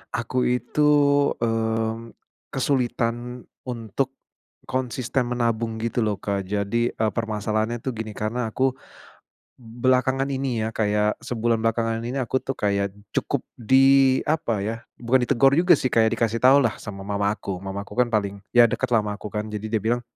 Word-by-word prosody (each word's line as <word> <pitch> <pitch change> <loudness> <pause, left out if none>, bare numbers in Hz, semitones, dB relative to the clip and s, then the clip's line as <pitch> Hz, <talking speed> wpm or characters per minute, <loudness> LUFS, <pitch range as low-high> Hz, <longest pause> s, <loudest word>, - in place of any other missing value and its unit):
aku 120 +2 -3
itu, 125 +4 -1 0.6
mmm, 115 0 -1 0.4
kesulitan 125 -2 -1 0.2
untuk, 120 +2 -2 0.6
konsisten 130 0 -1
menabung 115 -2 -1
gitu 115 +1 0
loh 105 - +1
Kak 100 -2 -2
jadi, 105 +4 -1
eee, 110 -1 0
permasalahannya 110 +1 -1
tuh 130 - -3
gini 110 -1 -5
karena 110 +2 -2
aku, 130 +3 +1 0.8
belakangan 130 +3 0
ini 130 -5 -1
ya 110 - -4
kayak 105 0 0
sebulan 115 -1 -1
belakangan 115 0 0
ini 120 +3 -4
aku 130 0 -1
tuh 135 - -4
kayak 100 -1 0 0.2
cukup - - -1
di 135 +2 +5
apa 150 -9 0
ya 110 +2 -2 0.2
bukan 125 +2 +2
ditegur 135 +3 +4
juga 175 +5 +5
sih 130 - -2
kayak 110 -1 +4
dikasih 115 0 0
tau 130 +2 +7
lah 125 -6 +2
sama 100 -2 -8
mama 100 0 0
aku, 95 -2 -5
mamaku 100 +1 -6
kan 125 0 +2
paling 100 -3 -1
ya 120 -1 +6
deketlah 115 -1 +1
ama 105 - -2
aku 105 - -8
kan 105 +1 -3
jadi 105 +1 -4
dia 110 - +1
bilang, 120 +2 +1
115 Hz, 160 wpm, -24 LUFS, 110-125 Hz, 0.8 s, tau